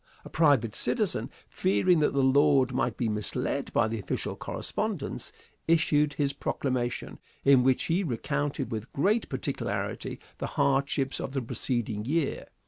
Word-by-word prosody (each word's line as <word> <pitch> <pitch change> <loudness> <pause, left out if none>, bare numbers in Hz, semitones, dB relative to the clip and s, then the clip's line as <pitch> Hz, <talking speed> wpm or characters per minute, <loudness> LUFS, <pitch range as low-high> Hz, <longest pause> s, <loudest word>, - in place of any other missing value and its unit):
A - - -8
private 140 -9 +3
citizen, - - 0 0.2
fearing 105 - +2
that 150 - +2
the 140 -1 +2
Lord 135 -1 +4
might 125 -3 0
be 120 - 0
misled 105 -1 -2
by - - +3
official 110 -2 -3
correspondence, - - -3 0.4
issued 150 -3 +3
his 140 -1 0
proclamation, 125 -3 -2 0.3
in 135 -2 +7
which 130 0 +3
he 175 +4 +1
recounted 145 +1 -2
with 110 +1 -5
great 205 +11 +1
particularity - - -3 0.2
the - - -2
hardships 135 0 +1
of 130 - -4
the 135 - 0
preceding 115 -3 -2
year. 150 +2 -1
135 Hz, 135 wpm, -28 LUFS, 120-145 Hz, 0.4 s, in